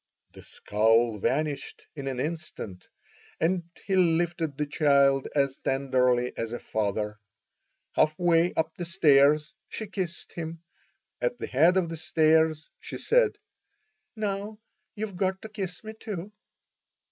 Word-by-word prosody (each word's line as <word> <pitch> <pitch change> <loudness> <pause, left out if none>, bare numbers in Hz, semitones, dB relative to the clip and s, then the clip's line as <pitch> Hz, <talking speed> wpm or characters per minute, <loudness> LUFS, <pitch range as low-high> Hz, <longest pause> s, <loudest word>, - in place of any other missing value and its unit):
The - - -12
scowl 110 +1 +1
vanished 145 +5 -2
in 140 -2 -6
an 130 -2 -3
instant, 150 - -5 0.5
and 175 +1 +1 0.2
he 195 - 0
lifted 170 -4 +1
the 150 - 0
child 140 -2 +3
as 140 -2 +1
tenderly 125 -2 +1
as 115 0 -3
a 120 - -3
father. 105 0 -2 0.7
Half 155 0 +2
way 175 0 +3
up 160 0 0
the 175 - -5
stairs 150 -3 +4 0.2
she 220 - -5
kissed 185 -4 -5
him. 165 0 -6 0.6
At 120 0 0
the - - -4
head 165 +8 +4
of 175 -3 +1
the 165 - -5
stairs 160 0 +2
she - - -6
said, 485 -2 +2 0.8
"Now, 210 0 -3 0.4
you've 210 -3 -5
got 190 0 0
to 220 - -7
kiss 195 -4 -5
me, 220 0 -7
too." 205 -3 -6
160 Hz, 135 wpm, -27 LUFS, 135-180 Hz, 0.8 s, stairs